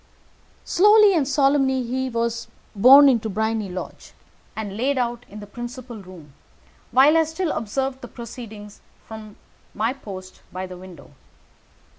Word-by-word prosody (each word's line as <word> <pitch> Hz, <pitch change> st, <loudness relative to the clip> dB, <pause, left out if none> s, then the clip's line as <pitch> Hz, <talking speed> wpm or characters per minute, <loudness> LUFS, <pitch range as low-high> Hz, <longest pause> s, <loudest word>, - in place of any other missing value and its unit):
Slowly 420 Hz, +2 st, +5 dB
and 305 Hz, -6 st, +1 dB
solemnly 270 Hz, -2 st, +2 dB
he 260 Hz, +2 st, -3 dB
was 230 Hz, -1 st, -2 dB, 0.3 s
borne 265 Hz, +7 st, +8 dB
into 230 Hz, -5 st, +2 dB
Briony 220 Hz, 0 st, -2 dB
Lodge, 180 Hz, 0 st, -8 dB, 0.4 s
and 205 Hz, -3 st, -5 dB
laid 265 Hz, +5 st, 0 dB
out 240 Hz, -1 st, -3 dB
in 210 Hz, +2 st, -10 dB
the -, -, -8 dB
principal 240 Hz, +2 st, -8 dB
room, 175 Hz, -6 st, -14 dB, 0.6 s
while 270 Hz, +6 st, +5 dB
I 325 Hz, -, +5 dB
still 320 Hz, +1 st, -3 dB
observed 265 Hz, +4 st, -3 dB
the -, -, -8 dB
proceedings 220 Hz, -3 st, -10 dB, 0.2 s
from 215 Hz, -2 st, -10 dB, 0.4 s
my 225 Hz, +4 st, 0 dB
post 190 Hz, -8 st, -11 dB
by 185 Hz, +1 st, -5 dB
the 185 Hz, 0 st, -9 dB
window. 180 Hz, -3 st, -13 dB
235 Hz, 140 wpm, -22 LUFS, 210-270 Hz, 0.6 s, borne